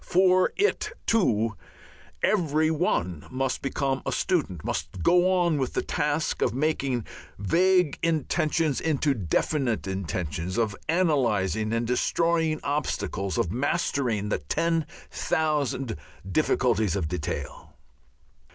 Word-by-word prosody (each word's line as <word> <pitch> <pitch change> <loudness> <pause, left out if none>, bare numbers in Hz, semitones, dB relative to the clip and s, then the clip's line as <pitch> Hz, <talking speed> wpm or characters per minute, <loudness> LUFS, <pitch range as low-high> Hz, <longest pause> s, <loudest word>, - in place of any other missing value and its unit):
For 185 0 +4
it, 415 +4 +1
too, 115 - +2 0.7
every 160 -6 +2
one 90 - -1
must 130 0 -2
become 135 -1 -1
a - - -2
student, 100 - -1
must 90 - -3
go 180 +1 +4
on 175 -5 +2
with 130 - -2
the - - 0
task 150 +1 -1
of - - +1
making 135 -5 0 0.3
vague 180 - +2
intentions 160 -1 +1
into 150 -2 +1
definite 120 - 0
intentions, 90 -1 -3
of 110 -4 +1
analyzing 115 - +1
and 115 +1 0
destroying 160 +6 +1
obstacles, 140 -9 -2
of 85 - 0
mastering 125 - 0
the - - 0
ten 165 - 0 0.2
thousand 145 -6 0 0.4
difficulties 115 - +2
of 90 -6 -1
detail.... 75 -4 -5
140 Hz, 115 wpm, -26 LUFS, 105-160 Hz, 0.7 s, For